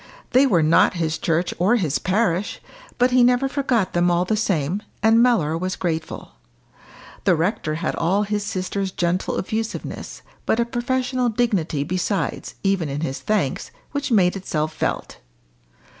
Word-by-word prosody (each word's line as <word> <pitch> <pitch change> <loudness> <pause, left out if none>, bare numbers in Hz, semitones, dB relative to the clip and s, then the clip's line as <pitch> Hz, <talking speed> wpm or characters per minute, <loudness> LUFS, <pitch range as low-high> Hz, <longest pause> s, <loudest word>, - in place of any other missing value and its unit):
They 260 +2 +5
were 175 -10 +3
not 160 +3 +4
his 160 -2 -1
church 170 +2 0
or 195 +7 +4
his 165 - 0
parish, 190 -1 0 0.4
but 250 +1 +3
he 250 0 +5
never 250 +2 +3
forgot 260 -7 0
them 175 0 +3
all 175 +1 +2
the 215 - 0
same, 190 -3 0 0.2
and 225 +1 +5
Mellor 190 -11 +3
was 185 +2 -2
grateful. 160 -3 -4 0.9
The 185 - +4
rector 165 -2 -1
had 165 +1 -2
all 195 +5 +1
his 210 0 -2
sister's 195 0 -2
gentle 175 +1 -1
effusiveness, 220 +3 -4 0.2
but 225 - +2
a 235 - +3
professional 250 +1 -1
dignity 205 - 0
besides, 180 0 -2
even 195 -6 +1
in 140 +2 -3
his 135 -4 -3
thanks, 205 -11 -1 0.2
which 285 -1 -3
made 185 -5 +4
itself 155 -5 -2
felt. - - -3
190 Hz, 155 wpm, -22 LUFS, 165-230 Hz, 0.9 s, They